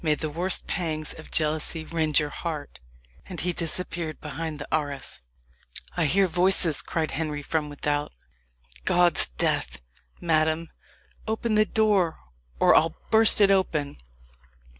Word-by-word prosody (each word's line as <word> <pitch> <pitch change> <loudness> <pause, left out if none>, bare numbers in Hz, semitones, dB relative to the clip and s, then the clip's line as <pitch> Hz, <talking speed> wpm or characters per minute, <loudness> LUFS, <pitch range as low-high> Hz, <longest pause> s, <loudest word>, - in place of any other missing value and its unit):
"May 155 -2 +2
the 155 0 -4
worst 180 +4 -1
pangs 155 -4 -3
of 160 - -12
jealously 155 +1 -1
rend 155 -2 +1
your 150 -1 +1
heart!" 150 - -6 0.5
And 180 - -7
he 180 +3 0
disappeared 170 -1 -3
behind 155 +1 -5
the 145 - -8
arras. 145 -3 -2 0.7
"I 175 - +1
hear 190 +6 +3
voices," 175 -3 +4
cried 160 -2 -2
Henry 150 -1 -3
from 150 0 -2
without. 145 0 -2 0.7
"God's 175 - +4
death! - - -1 0.4
madam, 160 0 +1 0.6
open 220 +1 -1
the 215 0 +4
door 205 -7 +1 0.4
or - - +5
I - - +9
will 160 0 -3
burst 220 -1 +5
it 200 -1 +6
open!" 155 - 0
160 Hz, 140 wpm, -25 LUFS, 150-180 Hz, 0.7 s, I